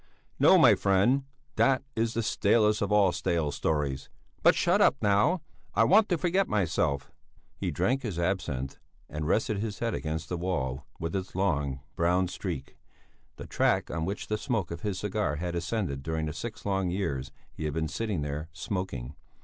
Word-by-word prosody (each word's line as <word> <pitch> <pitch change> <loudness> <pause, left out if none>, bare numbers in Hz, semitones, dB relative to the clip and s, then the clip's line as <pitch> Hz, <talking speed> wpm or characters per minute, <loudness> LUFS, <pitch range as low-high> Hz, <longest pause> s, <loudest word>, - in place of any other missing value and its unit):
"No, - - +7
my - - +7
friend. 100 +8 +2 0.3
That 135 -1 +3
is 115 0 0
the 115 - 0
stalest 105 +1 +3
of 100 0 0
all 100 -3 +5
stale 80 -4 0
stories. 70 -2 -1 0.3
But - - +6
shut - - +3
up, - - +5
now! 105 - +2 0.3
I - - +5
want 210 +2 +5
to 175 - +2
forget 185 +3 +1
myself." 80 -8 0 0.4
He - - -3
drank 135 +2 0
his 105 -9 -4
absinth 85 -7 -2 0.3
and 75 0 -4
rested 110 +2 +1
his 105 -1 -3
head 115 -2 -1
against 80 +2 -3
the 90 - -3
wall 70 -7 -2
with 85 +3 -3
its 95 -2 -4
long, 75 -9 0
brown 90 +2 +2
streak, 85 -8 -5 0.6
the - - -8
track - - +1
on 80 +1 -2
which 100 +3 -3
the 105 0 -2
smoke 110 -11 -1
of 85 0 -6
his 100 -3 -2
cigar 100 -5 -1
had 85 +3 -3
ascended 85 -5 -2
during 80 +2 -2
the 75 - -3
six 115 +6 -7
long 95 -2 0
years 70 -8 -2 0.2
he 80 - -5
had 75 - -1
been 80 -1 0
sitting 105 -5 -2
there, 75 +2 -4
smoking. 80 - -4
90 Hz, 180 wpm, -28 LUFS, 75-105 Hz, 0.6 s, No